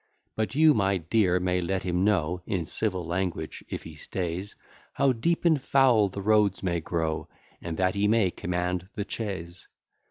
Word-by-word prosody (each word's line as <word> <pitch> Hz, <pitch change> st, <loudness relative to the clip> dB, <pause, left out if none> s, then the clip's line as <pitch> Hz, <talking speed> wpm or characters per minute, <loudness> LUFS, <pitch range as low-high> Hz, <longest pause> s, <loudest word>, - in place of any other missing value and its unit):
But 110 Hz, +4 st, -2 dB
you, 155 Hz, +1 st, +6 dB
my 100 Hz, -4 st, +2 dB
dear, 90 Hz, +1 st, +2 dB
may 90 Hz, 0 st, 0 dB
let 95 Hz, +2 st, -2 dB
him 90 Hz, 0 st, 0 dB
know, 90 Hz, -4 st, +1 dB
In 90 Hz, -5 st, -1 dB
civil 95 Hz, -1 st, -2 dB
language, 90 Hz, +1 st, -3 dB
if -, -, -5 dB
he -, -, -9 dB
stays, 90 Hz, +2 st, -4 dB, 0.4 s
How 140 Hz, -1 st, +3 dB
deep 165 Hz, +10 st, 0 dB
and 160 Hz, -5 st, +4 dB
foul 130 Hz, -6 st, +4 dB
the 100 Hz, +1 st, -6 dB
roads 105 Hz, -2 st, +3 dB
may 85 Hz, -2 st, 0 dB
grow, 80 Hz, -2 st, -2 dB, 0.3 s
And 85 Hz, -2 st, -5 dB
that 95 Hz, 0 st, +2 dB
he 100 Hz, +1 st, +1 dB
may 105 Hz, -4 st, +3 dB
command 90 Hz, +1 st, -2 dB
the 100 Hz, -, -3 dB
chaise. 95 Hz, -6 st, -5 dB
95 Hz, 170 wpm, -27 LUFS, 90-110 Hz, 0.4 s, you